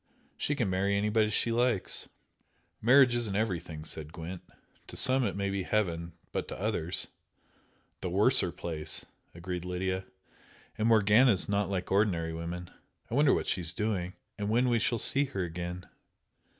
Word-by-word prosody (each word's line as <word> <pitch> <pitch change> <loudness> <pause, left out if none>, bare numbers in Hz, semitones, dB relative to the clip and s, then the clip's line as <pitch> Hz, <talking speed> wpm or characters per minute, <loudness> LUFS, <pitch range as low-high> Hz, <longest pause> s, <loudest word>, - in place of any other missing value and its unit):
She 145 - -1
can 120 -7 0
marry 100 +2 +1
anybody 105 +1 +2
she 115 +2 +1
likes." 120 -4 0 0.7
"Marriage 125 +2 +6
isn't 115 -5 -1
everything," 90 -7 -2
said 75 -1 -5
Gwent 85 +2 -7 0.5
"To - - -10
some 130 0 +4
it 100 - -1
may 100 0 -1
be 100 0 -1
heaven, 85 -5 -1 0.2
but - - -3
to - - -7
others 95 -4 -1 0.4
" - - -38
"The 90 - -3
worser 100 +1 +4
place!" 80 -3 -2 0.3
agreed 90 0 -5
Lydia 95 +1 -2 0.7
"And 110 - 0
Morgana 110 +2 +5
is 95 - 0
not 100 -1 0
like 95 -2 -3
ordinary 90 -5 +1
women. 85 +2 -6 0.4
I - - -4
wonder 145 +1 +4
what - - +1
she's 90 -1 -2
doing, 95 -3 -2 0.2
and 105 0 -2
when 120 +3 +2
we 120 -1 +2
shall 120 - +1
see 140 +5 +4
her 100 -8 -3
again?" 90 +1 -5
100 Hz, 165 wpm, -30 LUFS, 90-110 Hz, 0.7 s, Marriage